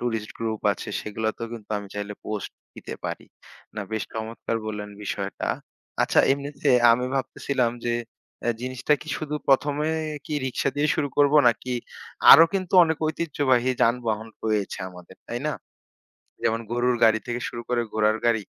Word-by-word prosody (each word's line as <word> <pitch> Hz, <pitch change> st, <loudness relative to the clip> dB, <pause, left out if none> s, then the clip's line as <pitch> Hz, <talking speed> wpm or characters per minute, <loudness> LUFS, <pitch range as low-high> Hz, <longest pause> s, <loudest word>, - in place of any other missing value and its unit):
Tourist 115 Hz, -3 st, -2 dB
group 110 Hz, -2 st, -2 dB
আছে, 95 Hz, -, -8 dB
সেগুলাতেও 110 Hz, +2 st, -3 dB
কিন্তু 110 Hz, -3 st, -9 dB
আমি 100 Hz, -1 st, -9 dB
চাইলে 105 Hz, 0 st, -4 dB
পোস্ট 105 Hz, -2 st, -4 dB, 0.2 s
দিতে -, -, -7 dB
পারি। -, -, -4 dB, 0.5 s
না, -, -, -2 dB
বেশ 110 Hz, -1 st, -1 dB
চমৎকার 115 Hz, +1 st, -3 dB
বললেন 105 Hz, -1 st, -5 dB
বিষয়টা! -, -, -3 dB, 0.5 s
আচ্ছা, -, -, +4 dB
এমনিতে 140 Hz, +1 st, -3 dB, 0.2 s
আমি 125 Hz, +2 st, +1 dB
ভাবতেছিলাম 130 Hz, -1 st, 0 dB
যে, 120 Hz, 0 st, +1 dB, 0.5 s
অ্যা 120 Hz, -, +1 dB
জিনিসটা 130 Hz, +3 st, -1 dB
কি -, -, -13 dB
শুধু 150 Hz, -1 st, -4 dB
১ম 140 Hz, +1 st, +4 dB
এ -, -, +1 dB, 0.4 s
কি 155 Hz, -, -3 dB
রিক্সা 130 Hz, +1 st, -1 dB
দিয়ে 145 Hz, +1 st, +2 dB
শুরু 145 Hz, -2 st, 0 dB
করবো? 145 Hz, +1 st, +5 dB
নাকি 125 Hz, +2 st, -1 dB, 0.6 s
আরো 165 Hz, -, +11 dB
কিন্তু 190 Hz, -1 st, -1 dB
অনেক 160 Hz, -1 st, -1 dB
ঐতিহ্যবাহী 140 Hz, -6 st, +1 dB
যানবাহন 115 Hz, -2 st, +1 dB, 0.2 s
রয়েছে 105 Hz, -3 st, -1 dB
আমাদের, 90 Hz, 0 st, -14 dB
তাই 120 Hz, -, -3 dB
না? 150 Hz, -, 0 dB, 0.9 s
যেমন 115 Hz, +1 st, +1 dB
গরুর 120 Hz, +1 st, +2 dB
গাড়ি 110 Hz, -1 st, +5 dB
থেকে 120 Hz, 0 st, -3 dB
শুরু 120 Hz, -, -6 dB
করে 120 Hz, -1 st, +2 dB
ঘোড়ার 110 Hz, 0 st, +2 dB
গাড়ি, 115 Hz, -3 st, +2 dB
120 Hz, 160 wpm, -25 LUFS, 110-135 Hz, 0.9 s, আরো